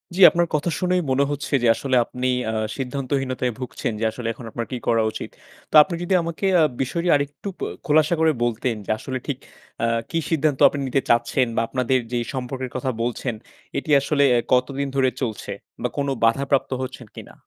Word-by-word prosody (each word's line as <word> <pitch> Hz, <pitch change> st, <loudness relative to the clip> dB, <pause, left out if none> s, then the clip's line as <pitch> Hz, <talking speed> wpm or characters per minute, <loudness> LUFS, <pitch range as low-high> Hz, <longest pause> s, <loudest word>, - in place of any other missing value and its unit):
জ্বী 195 Hz, -, 0 dB
আপনার 170 Hz, 0 st, +1 dB
কথা 150 Hz, +3 st, 0 dB
শুনেই 180 Hz, -1 st, +1 dB
মনে 135 Hz, +2 st, +3 dB
হচ্ছে 145 Hz, 0 st, -4 dB
যে -, -, +4 dB
আসলে 130 Hz, +1 st, -1 dB
আপনি 125 Hz, +2 st, -3 dB, 0.2 s
আ -, -, -4 dB, 0.2 s
সিদ্ধান্তহীনতায় 130 Hz, -1 st, -2 dB
ভুগছেন 125 Hz, -2 st, -3 dB
যে 115 Hz, -, 0 dB
আসলে 115 Hz, 0 st, -6 dB
এখন 115 Hz, +1 st, -11 dB
আপনার 115 Hz, +1 st, -3 dB
কি 125 Hz, -, -2 dB
করা 115 Hz, -1 st, +3 dB
উচিত? -, -, -6 dB, 0.4 s
তো -, -, -2 dB
আপনি 170 Hz, +2 st, -5 dB
যদি 185 Hz, -, 0 dB
আমাকে 170 Hz, +3 st, -4 dB, 0.2 s
আ -, -, +6 dB, 0.2 s
বিষয়টি 170 Hz, +7 st, -1 dB
আরেকটু 145 Hz, +6 st, -3 dB
প -, -, -21 dB, 0.2 s
খোলাসা 155 Hz, +2 st, +3 dB
করে 160 Hz, 0 st, +4 dB
বলতেন 120 Hz, 0 st, 0 dB
যে -, -, -2 dB
আসলে 130 Hz, -1 st, -4 dB
ঠিক, 140 Hz, -, -2 dB, 0.5 s
আ -, -, +4 dB, 0.2 s
কি 165 Hz, -, 0 dB
সিদ্ধান্ত 155 Hz, -4 st, +1 dB
আপনি 145 Hz, -, -5 dB
নিতে 135 Hz, +1 st, +1 dB
চাচ্ছেন? 120 Hz, +2 st, +3 dB
বা -, -, +2 dB
আপনাদের 130 Hz, 0 st, +1 dB
যেই 120 Hz, -1 st, -1 dB
সম্পর্কের 130 Hz, 0 st, -4 dB
কথা 130 Hz, +1 st, -1 dB
বলছেন, 120 Hz, +1 st, -2 dB, 0.4 s
এটি 140 Hz, -, -4 dB
আসলে 140 Hz, +1 st, +2 dB
এ -, -, +3 dB
কতদিন 135 Hz, +2 st, +1 dB
ধরে 130 Hz, -1 st, +3 dB
চলছে? 110 Hz, -5 st, -3 dB, 0.3 s
বা -, -, +1 dB
কোন 140 Hz, 0 st, 0 dB, 0.2 s
বাধাপ্রাপ্ত 135 Hz, +4 st, +2 dB
হচ্ছেন 130 Hz, -2 st, -7 dB
কিনা? -, -, -10 dB
130 Hz, 190 wpm, -23 LUFS, 125-145 Hz, 0.5 s, আ